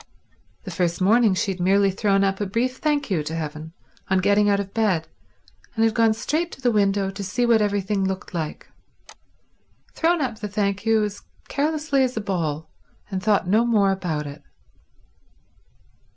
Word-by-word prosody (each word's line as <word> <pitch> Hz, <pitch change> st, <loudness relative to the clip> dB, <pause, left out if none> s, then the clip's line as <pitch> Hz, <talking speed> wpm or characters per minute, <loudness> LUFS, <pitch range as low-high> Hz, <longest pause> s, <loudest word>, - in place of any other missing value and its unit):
The -, -, -7 dB
first 175 Hz, -3 st, -1 dB
morning 210 Hz, +1 st, +4 dB
she 195 Hz, -, 0 dB
had 185 Hz, -, -6 dB
merely 195 Hz, +2 st, +3 dB
thrown 195 Hz, 0 st, +1 dB
up 195 Hz, +1 st, 0 dB
a 205 Hz, -, -1 dB
brief 245 Hz, +6 st, -1 dB
thank 290 Hz, -6 st, -1 dB
you 170 Hz, -5 st, +1 dB
to 155 Hz, +2 st, -5 dB
heaven 155 Hz, 0 st, -5 dB, 0.4 s
on 190 Hz, -, +3 dB
getting 205 Hz, +2 st, +3 dB
out 200 Hz, 0 st, +2 dB
of 195 Hz, -1 st, -5 dB
bed, 190 Hz, -8 st, +1 dB, 0.7 s
and 225 Hz, 0 st, +3 dB
had 225 Hz, -, +2 dB
gone 225 Hz, -1 st, +3 dB
straight 315 Hz, +9 st, -1 dB
to -, -, -11 dB
the 245 Hz, -2 st, +2 dB
window 200 Hz, -2 st, +1 dB
to 200 Hz, +1 st, -6 dB
see 225 Hz, +6 st, 0 dB
what 230 Hz, -2 st, +4 dB
everything 205 Hz, -1 st, 0 dB
looked 190 Hz, +1 st, -3 dB
like—thrown 320 Hz, -, -6 dB
up 250 Hz, -6 st, -2 dB
the 210 Hz, -, -4 dB
thank 200 Hz, +1 st, -2 dB
you 220 Hz, -1 st, +4 dB
as 205 Hz, -1 st, -4 dB, 0.3 s
carelessly 300 Hz, -1 st, 0 dB
as 255 Hz, -2 st, -2 dB
a -, -, 0 dB
ball, 160 Hz, -6 st, -2 dB, 0.4 s
and 190 Hz, -1 st, -2 dB
thought 205 Hz, -2 st, +2 dB
no 215 Hz, +5 st, +4 dB
more 210 Hz, -5 st, +3 dB
about 170 Hz, -6 st, -2 dB
it. 145 Hz, +1 st, -9 dB
200 Hz, 175 wpm, -23 LUFS, 190-225 Hz, 0.7 s, morning